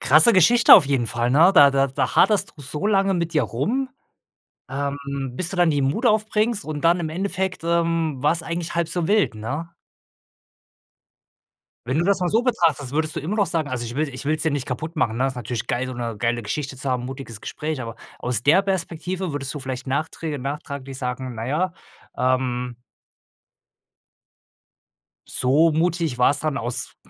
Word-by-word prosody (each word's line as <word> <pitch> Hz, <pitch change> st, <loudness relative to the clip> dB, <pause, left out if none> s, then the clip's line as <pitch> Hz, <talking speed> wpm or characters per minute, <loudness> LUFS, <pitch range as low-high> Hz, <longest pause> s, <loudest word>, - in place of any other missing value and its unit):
krasse 155 Hz, -, +6 dB
Geschichte 230 Hz, +6 st, +7 dB
auf -, -, +7 dB
jeden 135 Hz, -4 st, 0 dB
Fall, 120 Hz, +1 st, -1 dB
ne? 165 Hz, +8 st, +6 dB
Da 145 Hz, -4 st, +8 dB
da 135 Hz, 0 st, +2 dB
da 135 Hz, -1 st, -2 dB
haderst 210 Hz, -2 st, +3 dB
du 145 Hz, -, -11 dB
so 150 Hz, +8 st, -3 dB
lange 195 Hz, -2 st, +2 dB
mit 170 Hz, -1 st, -2 dB
dir 150 Hz, -, +3 dB
rum, 235 Hz, -, -1 dB, 0.8 s
ähm, 140 Hz, +1 st, -3 dB, 0.4 s
bis 185 Hz, -, -2 dB
du 190 Hz, -, -6 dB
dann 175 Hz, -2 st, +4 dB
die 145 Hz, -2 st, +1 dB
Mut 145 Hz, -, 0 dB
aufbringst 215 Hz, 0 st, +1 dB
und 150 Hz, -2 st, -5 dB
dann 170 Hz, +1 st, +3 dB
im 160 Hz, -, -2 dB
Endeffekt, 185 Hz, +1 st, -3 dB
ähm, 165 Hz, -4 st, 0 dB
war's 160 Hz, +3 st, +1 dB
eigentlich 170 Hz, 0 st, -4 dB
halb 170 Hz, -1 st, 0 dB
so 170 Hz, -1 st, -2 dB
wild, 210 Hz, -, +2 dB
ne? 140 Hz, +10 st, -5 dB, 2.2 s
Wenn 130 Hz, +3 st, 0 dB
du 170 Hz, -, +2 dB
das 200 Hz, 0 st, +2 dB
mal 180 Hz, -, 0 dB
so 225 Hz, +5 st, +2 dB
betrachtest, 165 Hz, -, +1 dB
würdest 155 Hz, +1 st, -1 dB
du -, -, -1 dB
immer 175 Hz, +8 st, -3 dB
noch 205 Hz, -2 st, +2 dB
sagen 160 Hz, -4 st, -2 dB
also, 130 Hz, -2 st, -3 dB
ich 120 Hz, +1 st, -7 dB
will 155 Hz, +1 st, 0 dB
ich 130 Hz, -, -7 dB
will's 155 Hz, +1 st, 0 dB
dir 160 Hz, -, +1 dB
nicht 140 Hz, -2 st, -2 dB
kaputt 155 Hz, +6 st, -5 dB
machen, 120 Hz, -6 st, 0 dB
ne? 130 Hz, +2 st, +2 dB
Ist 130 Hz, -, -5 dB
natürlich 120 Hz, -1 st, -4 dB
geil, 125 Hz, +1 st, -1 dB
so 130 Hz, -, -5 dB
'ne 120 Hz, -3 st, -4 dB
geile 120 Hz, +2 st, 0 dB
Geschichte 135 Hz, +6 st, -4 dB
zu 130 Hz, +1 st, -5 dB
haben, 125 Hz, -1 st, -1 dB
mutiges 130 Hz, -4 st, -8 dB
Gespräch. 155 Hz, -3 st, -4 dB
Aber 115 Hz, -2 st, -7 dB, 0.2 s
aus 120 Hz, -3 st, -1 dB
der 160 Hz, +8 st, +5 dB
Perspektive, 185 Hz, -1 st, -3 dB
würdest 135 Hz, -2 st, -4 dB
du 150 Hz, -, -5 dB
vielleicht 130 Hz, -1 st, -6 dB
nachträge 150 Hz, +1 st, -3 dB
nachträglich 140 Hz, 0 st, -6 dB
sagen: 125 Hz, 0 st, -4 dB
„Na 115 Hz, +1 st, -5 dB
ja, 175 Hz, +6 st, 0 dB, 0.4 s
ähm 125 Hz, -1 st, 0 dB, 2.5 s
so 150 Hz, +6 st, +3 dB
mutig 165 Hz, -3 st, 0 dB
war's 135 Hz, +3 st, +3 dB
dann 155 Hz, -3 st, -1 dB
aus” 120 Hz, -1 st, -4 dB
150 Hz, 185 wpm, -23 LUFS, 130-170 Hz, 2.5 s, Da